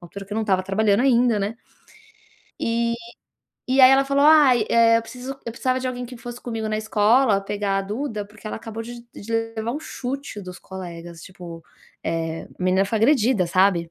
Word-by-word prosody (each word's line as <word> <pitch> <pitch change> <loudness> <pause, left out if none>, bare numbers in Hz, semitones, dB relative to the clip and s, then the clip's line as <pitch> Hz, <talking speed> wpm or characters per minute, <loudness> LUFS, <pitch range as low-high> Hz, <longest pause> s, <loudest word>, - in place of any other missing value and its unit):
altura 190 +3 -9
que 200 - -9
eu - - -2
não 225 - 0
estava 190 -3 +1
trabalhando 200 +2 +2
ainda, 245 -4 +3
né. 205 +3 -3 1.0
E 235 0 0 0.7
e 260 +1 +3
aí 255 0 +9
ela 270 +1 +5
falou: 275 +1 +2
"Ai, 280 -7 +6
eh, 230 0 +5
eu - - -4
preciso 250 +3 -8 0.2
eu 230 - -4
precisava 255 +2 -1
de 260 - -4
alguém 250 -1 -4
que 250 +1 -9
fosse 240 +1 -9
comigo 225 -2 -4
na 215 - -1
escola 220 +1 +3
pegar 200 0 -2
a - - -1
Duda, 210 +1 -4
porque 210 +1 -14
ela - - -4
acabou 225 0 -7
de 235 +1 -10
de 225 +3 -8 0.2
levar 220 +2 -2
um 295 - -4
chute 270 -6 -6
dos 185 -1 -9
colegas", 170 -3 -9
tipo, 170 -2 -10 0.4
eh, 165 0 -3
a - - -17
menina 185 +1 +3
foi 215 +2 -1
agredida, 230 -5 +3
sabe. 175 -1 +2
220 Hz, 200 wpm, -23 LUFS, 195-245 Hz, 1.0 s, aí